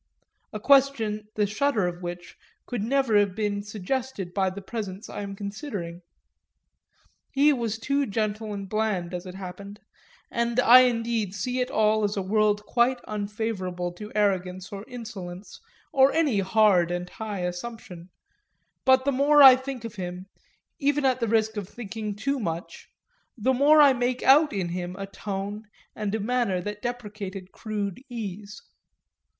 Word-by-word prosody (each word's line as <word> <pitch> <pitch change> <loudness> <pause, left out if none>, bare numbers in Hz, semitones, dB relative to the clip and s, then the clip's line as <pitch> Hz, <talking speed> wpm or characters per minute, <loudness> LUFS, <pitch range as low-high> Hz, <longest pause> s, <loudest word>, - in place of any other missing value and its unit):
a 215 - -5
question 225 -5 +3
the 210 - +2
shudder 220 0 +1
of 175 0 -4
which 175 0 -7 0.3
could 245 -4 -3
never 255 0 +1
have 200 -2 +1
been 205 -1 -1
suggested 210 -1 -4
by 190 -1 +1
the 185 +2 -7
presence 200 0 -6
I - - -6
am 200 -1 -6
considering. 200 - -6 1.3
He 285 +1 +4
too - - +2
was 225 -2 -2
gentle 220 -4 -1
and 200 -1 -5
bland, 195 -4 -1
as 180 +1 -5
it 180 - -8
happened 195 +2 -8 0.5
and 235 0 0
I 250 +1 +9
indeed 230 -4 -1
see 250 +5 -2
it 250 - 0
all 215 0 +2
as 205 0 0
a - - +1
world 210 +1 +1
quite 250 +1 +2
unfavourable 200 -4 -3
to 210 +4 -9
arrogance 185 -2 0
or 200 0 -6
insolence 200 -7 -8 0.3
or 270 0 +6
any 295 -10 +2
hard 195 -3 +4
and 175 0 -3
high 210 0 -5
assumption; 180 -1 -6 0.7
but 260 0 +4
the 280 - +3
more 285 +2 +5
I 265 -2 +11
think 260 -2 -6
of 230 -1 -8
him 180 0 -5 0.5
(even 285 0 +1
at 255 -1 +2
the 230 - 0
risk 220 0 +1
of 200 -2 -4
thinking 220 -2 -6
too 275 +6 -1
much) 170 -5 -5 0.5
the 255 +4 +2
more 290 +4 +5
I 285 -2 +8
make 245 0 -1
out 295 +3 +6
in 190 -4 -2
him 175 +1 -4
a 195 0 -5
tone 200 +1 -5 0.3
and 210 -1 -2
a - - -1
manner 230 -4 0
that 210 +3 -6
deprecated 205 -6 -6
crude 210 -1 -4
ease. 210 -3 -7
210 Hz, 160 wpm, -26 LUFS, 195-245 Hz, 1.3 s, I